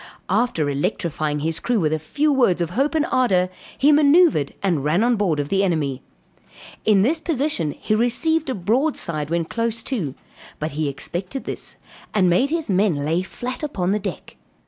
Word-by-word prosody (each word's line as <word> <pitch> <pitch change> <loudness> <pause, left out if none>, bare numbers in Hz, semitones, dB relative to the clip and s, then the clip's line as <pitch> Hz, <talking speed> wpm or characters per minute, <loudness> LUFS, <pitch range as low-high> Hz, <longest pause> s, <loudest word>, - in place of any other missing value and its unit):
After 200 -8 +1
electrifying 150 +1 -2
his 160 +1 -1
crew 240 -2 0
with 155 -3 +1
a 155 - 0
few 295 - 0
words 240 -10 +3
of 170 -1 -1
hope 275 - 0
and 310 -1 +2
ardor, 185 -8 +2 0.3
he 290 +3 +4
manoeuvred 295 - +4
and 170 -8 +1
ran 160 +8 +2
on 240 0 +3
board 185 -8 0
of 145 0 -2
the 195 0 +2
enemy. 145 -8 -1 0.8
In 205 -3 +4
this 315 +8 +1
position 285 - -1
he - - -1
received 285 +8 +1
a 260 - -1
broadside 185 - 0
when 170 0 0
close 230 +4 -2
too; 175 - -3 0.4
but 155 +1 -3
he 150 +1 -2
expected 180 - -5
this, - - -5 0.4
and 190 -3 +4
made 250 +11 +3
his 325 0 -2
men 185 -7 +1
lay 165 +4 +1
flat 245 +6 -6
upon 195 - -1
the 210 - +1
deck. 195 -3 -7
195 Hz, 180 wpm, -22 LUFS, 160-255 Hz, 0.8 s, he